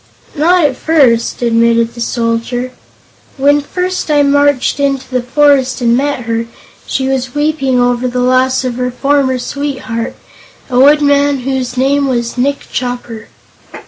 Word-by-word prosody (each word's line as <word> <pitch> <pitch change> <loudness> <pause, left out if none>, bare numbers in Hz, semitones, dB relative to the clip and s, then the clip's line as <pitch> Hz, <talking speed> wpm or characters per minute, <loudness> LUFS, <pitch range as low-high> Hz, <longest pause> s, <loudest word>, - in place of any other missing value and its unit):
"Not 335 +2 +3
at 275 -3 0
first," 250 -8 +1
admitted 230 0 +2
the 235 - -9
Soldier. 235 +1 -2 0.7
"When 285 +2 +3
first 365 +4 -3
I 295 -1 +3
marched 285 -1 +2
into 275 -2 -1
the 255 -1 -2
forest 270 +1 +2
and 235 -1 +2
met 280 0 -1
her, 230 0 -3 0.4
she 265 - -1
was 260 -1 -2
weeping 290 -4 0
over 245 0 +1
the 250 0 -4
loss 255 +1 +2
of 245 -1 -3
her 250 0 -1
former 270 0 0
sweetheart, 255 -3 -4 0.6
a 250 - +2
woodman 285 0 +3
whose 255 -1 -3
name 275 +2 +1
was 235 -3 -2
Nick 275 +3 -1
Chopper." 245 -3 -5
260 Hz, 145 wpm, -13 LUFS, 245-285 Hz, 0.7 s, Not